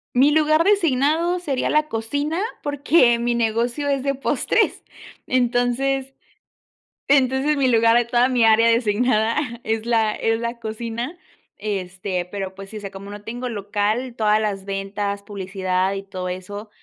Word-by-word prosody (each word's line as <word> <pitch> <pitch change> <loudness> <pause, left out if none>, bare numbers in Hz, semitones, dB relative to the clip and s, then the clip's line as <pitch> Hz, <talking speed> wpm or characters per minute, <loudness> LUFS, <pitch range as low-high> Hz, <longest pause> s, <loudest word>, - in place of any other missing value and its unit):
Mi 275 +4 +5
lugar 310 +1 +3
designado 335 -2 +2
sería 280 -7 -1
la 305 0 +2
cocina 285 +9 -2 0.2
porque 285 -4 +3
mi 240 0 0
negocio 235 +5 0
es 275 -1 +1
de 275 0 0
postres, 270 - 0 0.4
entonces 255 +2 0 1.0
entonces, 275 +2 +3
mi 265 -2 +2
lugar 230 -1 +4
de 240 - +2
toda 240 +2 +2
mi 245 -3 +3
área 225 +1 +5
designada 230 0 +2 0.3
es 220 0 -1
la 225 -2 +2
es 225 0 0
la 235 0 -4
cocina, 230 +8 -5 0.4
este, 185 -2 -3
pero, 190 +1 -6
pues 195 0 -10
sí, 220 - -8
o - - -5
sea, 200 -2 -7
como 195 +1 -9
no 205 0 -9
tengo 245 +3 -5
local, 215 +4 -2
todas 215 -1 +2
las 205 -3 -2
ventas, 200 +1 -3
publicidad 190 -1 -2
y 195 - -5
todo 185 -2 -5
eso, 205 +4 -7
230 Hz, 155 wpm, -22 LUFS, 205-265 Hz, 1.0 s, Mi